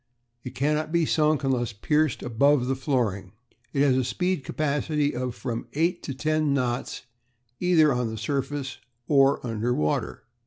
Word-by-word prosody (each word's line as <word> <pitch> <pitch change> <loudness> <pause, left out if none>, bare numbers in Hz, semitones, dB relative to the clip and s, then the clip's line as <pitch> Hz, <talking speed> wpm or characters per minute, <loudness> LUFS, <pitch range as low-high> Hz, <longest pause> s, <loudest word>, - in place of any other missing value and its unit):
It 125 - -8
cannot 150 +3 0
be 170 -1 +2
sunk 155 -1 +2
unless 125 -5 0
pierced 150 +7 0
above 125 +3 +3
the 135 +1 0
flooring. 115 -9 -1 0.4
It 140 - +2
has 135 -3 +4
a 130 - +2
speed 180 +6 -1
capacity 150 -1 -1
of 125 -1 -3
from 120 -3 -4
eight 170 +4 0
to 135 - -5
ten 155 0 +1
knots 125 -1 -2 0.6
either 160 -5 +4
on 125 -2 -1
the 110 - -5
surface 135 +3 -3 0.3
or 140 -3 +3
under 115 +1 -1
water. 75 0 -1
135 Hz, 155 wpm, -26 LUFS, 125-150 Hz, 0.6 s, has